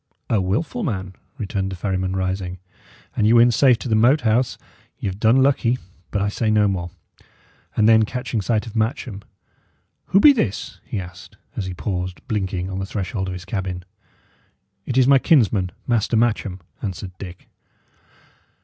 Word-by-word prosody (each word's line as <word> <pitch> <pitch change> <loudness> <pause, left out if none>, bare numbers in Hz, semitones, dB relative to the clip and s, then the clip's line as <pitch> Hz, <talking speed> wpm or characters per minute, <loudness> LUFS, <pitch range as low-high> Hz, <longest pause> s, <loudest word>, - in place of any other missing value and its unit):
"A 110 -4 +3
wilful 145 - -1
man!" 95 - -3 0.2
returned 95 -4 -2
the - - -4
ferryman, 95 0 -2
rising. 95 -1 -2 0.6
"An 105 - +2
ye 110 - +5
win 120 +1 +7
safe 125 +1 +5
to 120 - -6
the 115 - +1
Moat 125 +7 +4
House, 120 +2 +1 0.4
y' - - -7
have 95 0 -3
done 120 +4 +5
lucky; 130 -3 +2 0.3
but 100 - -1
I - - +1
say 110 +2 -1
no 105 -1 +4
more." 90 -3 -2 0.9
And 110 - +4
then 110 0 +7
catching 120 0 -2
sight 110 +1 0
of 115 - -9
Matcham, 110 -2 -2 0.9
"Who 195 - +4
be 285 +7 +8
this?" 115 - -2
he 105 - -4
asked, 90 -2 -10 0.2
as 95 - -3
he 90 - -5
paused, 90 -1 -4
blinking, 95 -4 -2
on 95 0 -4
the 95 - -2
threshold 95 -1 -3
of 95 - -3
his 90 -1 -7
cabin. 90 -2 -4 1.0
"It 130 - -1
is 130 -1 +5
my 140 -1 +6
kinsman, 110 - +3 0.2
Master 115 -1 +1
Matcham," 105 -5 0 0.2
answered 95 -2 -5
Dick. 90 -3 -9
105 Hz, 170 wpm, -22 LUFS, 95-120 Hz, 1.0 s, be